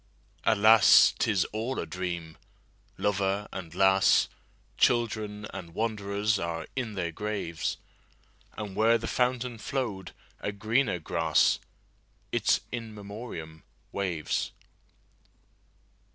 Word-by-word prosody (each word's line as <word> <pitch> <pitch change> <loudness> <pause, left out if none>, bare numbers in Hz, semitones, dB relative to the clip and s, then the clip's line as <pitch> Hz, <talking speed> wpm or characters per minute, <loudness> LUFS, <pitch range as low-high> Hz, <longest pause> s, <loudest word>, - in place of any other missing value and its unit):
Alas! 110 -1 +7
't - - +2
is 100 -5 +2
all 115 +5 -3
a - - -2
dream. 85 -3 -5 0.6
Lover 100 0 0
and 85 -3 -7
lass, 95 0 +4 0.5
Children 110 -3 +1
and 85 -3 -8
wanderers, 105 -1 0
are 85 -1 -3
in 120 -5 -3
their 85 -3 -2
graves; 100 -3 -3 0.8
And 105 -3 -5
where 115 +2 +4
the 115 - -6
fountain 125 -1 0
flow'd 105 -8 -3 0.3
a 105 - -3
greener 110 +1 +1
grass—Its 80 -2 0
In 115 -3 -5
Memoriam—waves. 95 -4 -5
105 Hz, 95 wpm, -28 LUFS, 90-110 Hz, 0.8 s, Alas